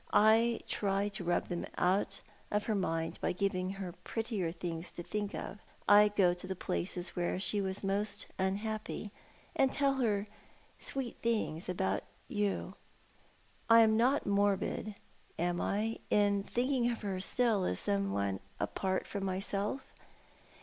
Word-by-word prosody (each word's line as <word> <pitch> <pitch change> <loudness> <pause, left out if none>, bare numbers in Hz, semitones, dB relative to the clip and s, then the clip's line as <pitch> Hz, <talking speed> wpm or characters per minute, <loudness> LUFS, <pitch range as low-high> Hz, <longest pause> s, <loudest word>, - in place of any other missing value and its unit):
I 225 +2 +5
try 200 0 0
to 195 -2 -4
rub 175 0 +1
them 175 - -2
out 195 +1 +1 0.3
of 210 0 +1
her 220 - 0
mind 165 -5 -1
by - - +1
giving 185 0 -1
her 195 -2 -5
prettier 220 -7 -2
things 170 -1 -3
to 175 - -6
think 205 +2 -3
of. 205 - -6 0.3
I 205 +1 +8
go 195 -4 +3
to 175 - -8
the 190 - -3
places 180 0 -2
where 175 +1 0
she 205 +1 +1
was 190 0 -3
most 200 +2 -1
unhappy, 210 +2 -2 0.4
and 270 -1 +4
tell 275 -1 +2
her 210 -5 +1 0.5
sweet 265 -3 -4
things 215 -8 0
about 185 +1 0 0.3
you. 205 -2 -1 1.0
I 230 0 +9
am 220 -1 +5
not 255 +5 +3
morbid, 200 +1 +1 0.4
am 175 +1 0
I, 220 +3 0
in 205 -1 +3
thinking 245 +3 +1
of 230 -2 -3
her 195 -2 -2
still 220 0 +2
as 90 - 0
some 200 -1 0
one 100 -1 0 0.2
apart 190 -1 -1
from 200 -2 -4
myself? 195 +5 -1
200 Hz, 150 wpm, -33 LUFS, 185-220 Hz, 1.0 s, I